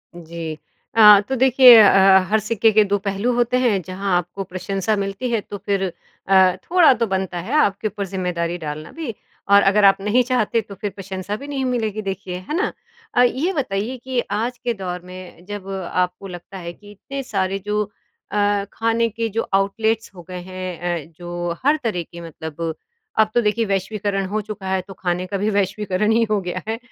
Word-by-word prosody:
जी। 165 -1 -6 0.4
अ, 210 -2 +9
तो 265 - 0
देखिए 260 -1 +8
अ, 215 -2 +8
अ, 190 0 +6
हर 220 - +3
सिक्के 220 +1 +2
के 215 0 +5
दो 205 0 0
पहलू 200 +5 0
होते 240 +1 +1
हैं। 225 -7 +2
जहाँ 185 +2 -2
आपको 180 +3 -4
प्रशंसा 195 +3 -2
मिलती 200 +5 -3
है 230 - +2
तो 205 - -8
फ़िर 195 0 -1 0.4
अ, 190 -1 +5
थोड़ा 345 -6 +5
तो 230 - 0
बनता 190 -2 -2
है 195 +10 -5
आपके 205 -4 +1
ऊपर 200 0 -4
ज़िम्मेदारी 175 -2 -2
डालना 155 -1 -6
भी 315 -8 -5 0.4
और 200 0 +8
अगर 210 +1 +2
आप 195 - +6
नहीं 215 +5 +2
चाहते 235 -2 +1
तो 200 -1 -11
फ़िर 200 +1 -4
प्रशंसा 195 +1 -5
भी 280 +5 -9
नहीं 275 -2 -3
मिलेगी 220 -4 -1
देखिए, 195 -2 -5
है 185 - -5
ना? 405 +5 0 0.4
अ, 245 - +5
ये 280 +10 +1
बताइए 245 - -2
कि 260 -2 -1
आज 235 +4 -1
के 240 -1 -2
दौर 180 -3 -5
में 180 -1 -11
जब 205 -1 -7
आपको 180 0 -2
लगता 180 +1 -9
है 170 -1 -7
कि 205 +2 -16
इतने 275 +7 -7
सारे 195 -3 -1
जो 210 0 0 0.5
अ, 205 -1 +1
खाने 230 +1 +1
के 230 +2 -3
जो 225 +3 -1
आउटलेट्स 220 +3 0
हो 175 - -10
गए 180 - -5
हैं 175 -2 -4
अ, - - -24
जो 175 -1 -4
हर 295 +2 +4
तरह 195 -7 -1
के 170 0 -9
मतलब 160 +1 -5 0.5
अब 215 0 +5
तो 240 - +3
देखिए 225 +1 +1
वैश्वीकरण 195 0 -1
हो 210 +3 -2
चुका 210 -2 -7
है 190 -1 +1
तो 195 - -9
खाने 180 0 -1
का 200 +1 -2
भी 205 +2 0
वैश्वीकरण 200 +1 0
ही 230 +1 +3
हो 210 - +2
गया 180 0 -4
है। 225 - -2
200 Hz, 200 wpm, -21 LUFS, 185-225 Hz, 0.5 s, अ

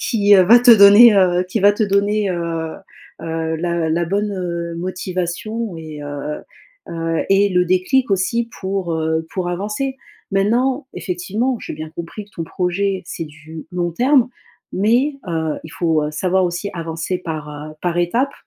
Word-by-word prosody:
qui 205 -5 +2
va 195 +6 +7
te 245 0 +6
donner, 210 +1 +9
heu, 180 -2 +3
qui 200 +3 -2
va 205 +1 +6
te 215 - -1
donner, 205 0 +1
heu 165 -2 -3 0.5
heu, 160 0 -3
la 170 -1 -1
la 170 +1 +1
bonne 180 -3 -3
motivation 185 +4 -4
et 155 -2 -8
heu 145 +1 -5 0.5
heu, 165 -1 -2
et 195 +1 +4
le 180 -1 +2
déclic 185 +8 +1
aussi 230 +5 0
pour, 190 -3 -2
heu, 160 0 -1
pour 180 -2 -2
avancer. 210 +9 -3 0.3
Maintenant, 245 +8 +1
effectivement, 210 +8 -2
j'ai - - -6
bien 155 +1 -7
compris 170 +5 -7
que 205 - -25
ton 165 - -5
projet, 185 +3 -1
c'est 165 -1 -5
du 155 +1 -11
long 175 -1 -1
terme, 255 - +3 0.4
mais 245 +9 +2
heu, 160 -3 -2
il 160 - -9
faut, 160 -2 0
heu, 150 - -3
savoir 185 +4 +1
aussi 175 +3 -3
avancer 165 +2 -3
par 155 -2 -7
par 175 -1 -1
étapes. 235 +11 +1
180 Hz, 160 wpm, -19 LUFS, 165-205 Hz, 0.5 s, donner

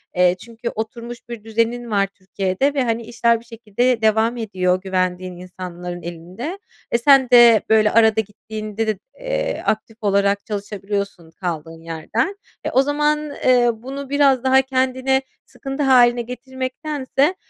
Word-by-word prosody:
Eee, 180 0 +4
çünkü 235 +2 -6
oturmuş 235 +2 -5
bir 235 -3 -7
düzenin 230 +1 -1
var 200 -1 +2
Türkiye'de 195 +6 -2
ve, 270 - +2
hani, 230 -1 -1
işler 235 0 +1
bir 230 - -19
şekilde 230 +1 -1
devam 220 +2 +2
ediyor, 185 -5 0
güvendiğin 185 -1 -2
insanların 180 -1 -7
elinde. 180 - -6 0.3
Eee, - - +5
sen 270 0 +5
de 240 -3 +8
böyle 215 -1 +4
arada 220 -1 +4
gittiğinde 215 +1 -5
de, 215 -2 -1 0.2
eee, - - -2
aktif 220 +1 -2
olarak 200 0 +2
çalışabiliyorsun 200 -4 -4
kaldığın 165 -2 -5
yerden. 165 - -2 0.3
Eee, - - -1
o 260 - +5
zaman, 295 +1 0
eee, 245 -1 +5
bunu 265 +5 -7
biraz 275 -3 +3
daha 265 0 +5
kendine 260 0 +1 0.2
sıkıntı 270 +2 -5
hâline 245 -3 +5
getirmektense, 260 +5 -2
230 Hz, 140 wpm, -20 LUFS, 200-260 Hz, 0.3 s, de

